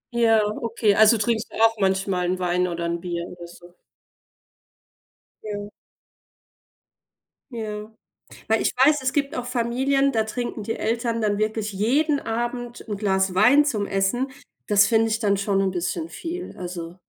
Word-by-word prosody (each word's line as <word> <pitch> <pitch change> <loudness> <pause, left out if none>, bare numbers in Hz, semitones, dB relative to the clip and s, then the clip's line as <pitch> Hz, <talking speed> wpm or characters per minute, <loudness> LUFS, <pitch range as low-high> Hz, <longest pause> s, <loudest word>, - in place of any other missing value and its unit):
Ja, 225 -2 +4 0.2
okay. 230 -2 +1
Also 220 +2 +6
trinkst 220 +1 -1
du - - -10
auch 225 0 +5
manchmal 190 -2 0
'n 185 +1 0
Wein 180 0 0
oder 170 -1 -3
'n 170 0 -2
Bier 170 -1 -4
oder 175 -1 -10
so? 175 0 -16 1.7
Ja. 205 -1 -5 1.8
Ja. 215 -2 -6 0.6
Weil 220 0 +2
ich - - 0
weiß, 290 +3 +5
es 260 0 -1
gibt 285 -1 -1
auch 245 - -3
Familien, 260 +3 +1
da 220 -3 +1
trinken 230 0 -4
die 225 +2 -3
Eltern 230 0 -1
dann 205 -1 +1
wirklich 215 0 -1
jeden 280 +9 +1
Abend 240 +1 -4
'n 205 -2 -3
Glas 190 -2 +1
Wein 255 +9 +6
zum 215 -8 -1
Essen. 200 +8 0 0.4
Das 205 -1 +5
finde 225 0 +3
ich 220 - 0
dann 200 -3 +1
schon 195 -1 +1
'n 190 -1 +1
bisschen 185 - -3
viel, 350 +2 -6
also 175 -1 -6
220 Hz, 160 wpm, -23 LUFS, 195-240 Hz, 1.8 s, Also